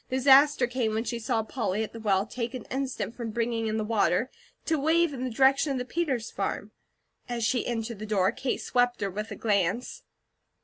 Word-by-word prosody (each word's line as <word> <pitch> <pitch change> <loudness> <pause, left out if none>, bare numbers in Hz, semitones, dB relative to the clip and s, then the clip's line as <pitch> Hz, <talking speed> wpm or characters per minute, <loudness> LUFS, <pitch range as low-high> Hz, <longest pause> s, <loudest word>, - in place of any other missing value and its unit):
Disaster 265 +1 +5
came 240 -3 -1
when 220 - 0
she 235 -1 -3
saw 220 0 0
Polly, 220 -2 -2
at 220 - -7
the 230 - -8
well, 200 -3 +1
take 240 +2 -4
an 250 - -6
instant 265 -3 -3
from 235 -2 -5
bringing 230 0 -1
in 215 0 -1
the 220 - -1
water, 215 +2 +1 0.3
to 320 -2 +1
wave 325 +2 +2
in 255 -2 -5
the 260 - -1
direction 275 +4 +3
of - - -2
the 250 - -3
Peters 265 -6 -2
farm. - - -3 0.6
As 240 -1 -2
she 245 +1 +1
entered 230 -2 -3
the 215 - -6
door, 195 -2 +2
Kate 255 +2 -3
swept 245 -1 +1
her 200 -1 -1
with 210 +3 -5
a - - -6
glance. 205 +2 0
235 Hz, 210 wpm, -27 LUFS, 220-260 Hz, 0.6 s, Disaster